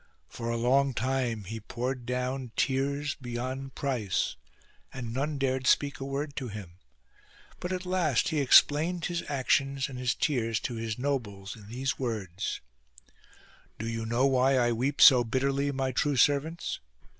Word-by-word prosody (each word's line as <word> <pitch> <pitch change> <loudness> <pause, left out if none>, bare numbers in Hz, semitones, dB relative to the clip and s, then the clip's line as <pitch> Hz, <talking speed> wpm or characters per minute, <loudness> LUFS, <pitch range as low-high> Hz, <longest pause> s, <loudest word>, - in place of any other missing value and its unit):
For 115 - -5
a 115 - 0
long 130 +2 +2
time 125 -3 -1
he 110 +4 -6
poured 125 +3 -4
down 125 -1 -2
tears 140 +2 0
beyond 130 +2 -5
price, 120 -10 -1 0.6
and 120 -3 -6
none 145 +3 -1
dared 130 -1 0
speak 140 +1 +3
a 135 - -4
word 140 +1 -3
to 130 -3 -3
him; 95 -5 -9 0.8
but 180 - -4
at 185 0 -3
last 175 -8 +1
he 155 -2 0
explained 155 +5 +5
his 175 -1 -2
actions 135 0 +1
and 130 -2 -7
his 125 0 0
tears 115 -6 0
to 125 - -3
his 115 -1 -3
nobles 110 -8 -3
in 105 -3 -14
these 130 +4 -3
words: 105 -7 -3 0.4
— - - -28
" - - -28
Do 115 - -4
you 115 -1 -3
know 120 +3 +2
why 135 0 +3
I 120 -1 +3
weep 130 +5 -1
so 125 -3 +9
bitterly, 135 +4 0
my 135 -1 -1
true 145 +3 +1
servants 145 +6 +1
130 Hz, 165 wpm, -29 LUFS, 115-140 Hz, 0.8 s, so